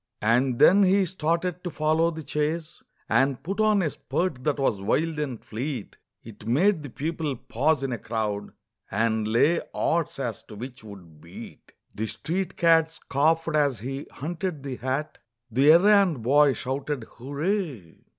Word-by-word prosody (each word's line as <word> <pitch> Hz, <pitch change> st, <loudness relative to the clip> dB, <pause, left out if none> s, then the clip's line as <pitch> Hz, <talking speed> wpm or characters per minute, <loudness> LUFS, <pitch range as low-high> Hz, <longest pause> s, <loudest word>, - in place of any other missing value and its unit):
And 120 Hz, +3 st, +2 dB
then 195 Hz, +10 st, +6 dB
he 195 Hz, 0 st, +4 dB
started 170 Hz, 0 st, -2 dB
to 180 Hz, -, -3 dB
follow 160 Hz, +1 st, +1 dB
the 160 Hz, -1 st, -7 dB
chase, 155 Hz, +2 st, -3 dB, 0.3 s
And 135 Hz, -1 st, +1 dB
put 195 Hz, +5 st, -4 dB
on 215 Hz, -3 st, +3 dB
a 155 Hz, -, 0 dB
spurt 145 Hz, -1 st, -3 dB
that 150 Hz, -2 st, +1 dB
was 120 Hz, -8 st, 0 dB
wild 155 Hz, +10 st, 0 dB
and 135 Hz, -6 st, -4 dB
fleet, 125 Hz, 0 st, -5 dB, 0.2 s
It 110 Hz, -1 st, -12 dB
made 165 Hz, -, +3 dB
the 145 Hz, -, -7 dB
people 155 Hz, +1 st, -3 dB
pause 140 Hz, +5 st, 0 dB
in 135 Hz, -, -2 dB
a 120 Hz, -, -3 dB
crowd, 105 Hz, -2 st, -3 dB, 0.4 s
And 110 Hz, +1 st, 0 dB
lay 145 Hz, +10 st, +3 dB
odds 165 Hz, -1 st, 0 dB
as 120 Hz, -6 st, -4 dB
to 105 Hz, -, -10 dB
which 125 Hz, +2 st, -8 dB
would 90 Hz, -8 st, -13 dB
beat. 85 Hz, -, -12 dB, 0.2 s
The 110 Hz, +1 st, -3 dB
street 180 Hz, -, -3 dB
cad 165 Hz, -1 st, +4 dB
scoffed 160 Hz, +1 st, 0 dB
as 140 Hz, -7 st, +1 dB
he 135 Hz, +4 st, -5 dB
hunted 165 Hz, 0 st, -4 dB
the 135 Hz, -3 st, -5 dB
hat, 135 Hz, +4 st, -3 dB, 0.3 s
The 135 Hz, +6 st, +5 dB
errand 185 Hz, -, +4 dB
boy 140 Hz, +3 st, +5 dB
shouted 135 Hz, +2 st, -3 dB
hooray! 140 Hz, -, -4 dB
145 Hz, 160 wpm, -26 LUFS, 120-165 Hz, 0.4 s, then